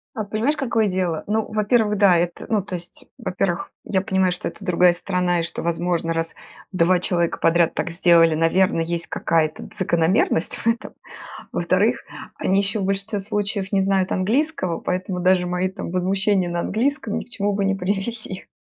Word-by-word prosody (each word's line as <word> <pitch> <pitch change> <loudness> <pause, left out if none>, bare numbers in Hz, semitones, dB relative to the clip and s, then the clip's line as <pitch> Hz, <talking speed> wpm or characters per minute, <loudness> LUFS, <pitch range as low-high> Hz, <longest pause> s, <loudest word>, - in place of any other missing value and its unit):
А, 215 - -3
понимаешь, 220 +9 0
какое 230 -6 +1
дело? 180 -4 -1
Ну, 220 +1 -1
во-первых, 215 0 +2
да, 195 -3 +5
это 175 +1 -1
ну, 215 -2 +1
то 185 -1 -6
есть, 175 0 -8
во-первых, 185 -5 -2
я 190 -2 0
понимаю, 190 -1 +1
что 180 - -3
это - - -9
другая 180 -1 +4
страна 180 -1 0
и 165 - -1
что, 165 - -4
возможно, 170 0 -1
раз 165 0 -3 0.4
2 180 0 +3
человека 170 -2 0
подряд 170 0 +3
так - - -2
сделали, 165 -1 +4
наверное, 165 +1 +2
есть 170 0 -3
какая-то 160 -2 -1
закономерность 170 -1 +1
в - - -6
этом. 230 0 0 0.6
Во-вторых, - - +1 0.4
они 195 +1 +1
ещё 200 +1 0
в 190 - -1
большинстве 195 +2 -2
случаев 200 -1 -2
не 195 -2 +2
знают 190 -1 +1
английского, 205 - 0
поэтому 180 0 -2
даже 180 0 +3
мои 180 +1 0
там 185 - -7
возмущения 190 +1 +1
на 175 0 -1
английском 230 - -1
ни - - -6
к - - -25
чему 205 -2 -1
бы 200 0 0
не 195 0 +1
привели. 195 +1 -4
185 Hz, 175 wpm, -22 LUFS, 175-205 Hz, 0.6 s, да